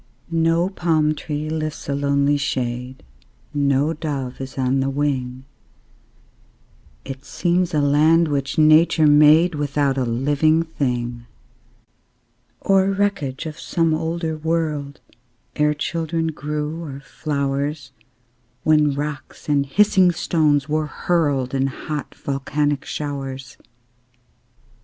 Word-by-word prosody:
No 165 +1 +2
palm 160 -5 +1
tree 150 0 -4
lifts 155 -1 -4
a 140 - -1
lonely 140 0 +2
shade, 125 -2 -3 0.5
No 140 +1 +1
dove 140 -5 -4
is 135 0 -8
on 130 +1 +1
the 135 +1 0
wing; 135 -2 -2 1.6
It 135 0 -7
seems 175 +4 0
a 150 - +1
land 155 +4 +4
which 140 -2 -2
Nature 155 +1 +5
made 150 +4 +6
Without 145 -2 0
a - - +1
living 145 +7 +2
thing, 120 -6 -3 1.3
Or 195 0 +3
wreckage 195 -9 -1
of 155 0 -7
some 165 -2 0
older 160 0 -2
world, 155 -3 -2 0.5
Ere 150 0 +2
children 165 +1 -2
grew, 150 +1 -4
or 140 -4 -7
flowers, 140 -1 -3 0.7
When 150 -2 +3
rocks 145 -2 -6
and 140 -2 +1
hissing 190 +2 +4
stones 150 -4 +1
were 155 0 0
hurled 145 -6 0
In 135 0 +1
hot, 150 +2 -6
volcanic 145 +1 -2
showers. 135 -2 -5
150 Hz, 110 wpm, -21 LUFS, 135-160 Hz, 1.6 s, made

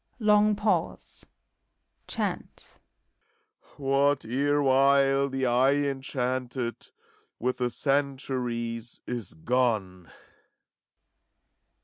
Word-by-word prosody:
Long 210 -2 +4
pause. 210 +1 -2 0.8
Chant, - - -5 1.0
What 140 -1 +1
erewhile 140 +1 +3
the 135 0 -1
eye 130 +3 +3
enchanted 130 -3 -3 0.5
With 125 +2 -2
the 125 -1 +1
centuries 125 -4 -2
is 115 -10 -5
gone. 100 -3 -1
130 Hz, 65 wpm, -27 LUFS, 120-140 Hz, 1.0 s, Long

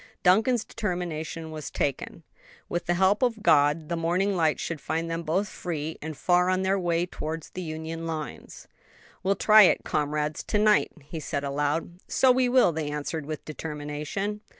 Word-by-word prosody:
Duncan's 220 +6 +4
determination 165 -6 -4
was 155 -2 -6
taken: 140 -3 -3 0.4
with 175 - -3
the 175 - +2
help 190 +3 +3
of 230 -4 0
God 150 -1 +4
the 170 - -2
morning 180 +4 +1
light 160 -3 +2
should 165 -4 -4
find 165 +1 -2
them 165 0 -2
both 175 +6 0
free 160 -5 -5
and 155 -1 -6
far 180 +4 +3
on 185 0 +1
their 195 +1 +1
way 170 -1 +1
towards 160 -2 -6
the 185 - -6
Union 160 0 -5
lines. 155 -5 -6 0.5
"We'll 195 +2 +1
try 215 +1 +7
it, 190 - +5
comrades, 150 0 -1
to 210 - 0
night," 210 0 +4
he 160 +3 -7
said 145 -1 -3
aloud. 145 +5 -2
"So 260 - +4
we 250 0 +2
will," 250 -7 +5
they 155 -2 -3
answered 150 +1 -4
with 155 -1 -5
determination. 150 +7 -4
165 Hz, 175 wpm, -27 LUFS, 155-190 Hz, 0.5 s, try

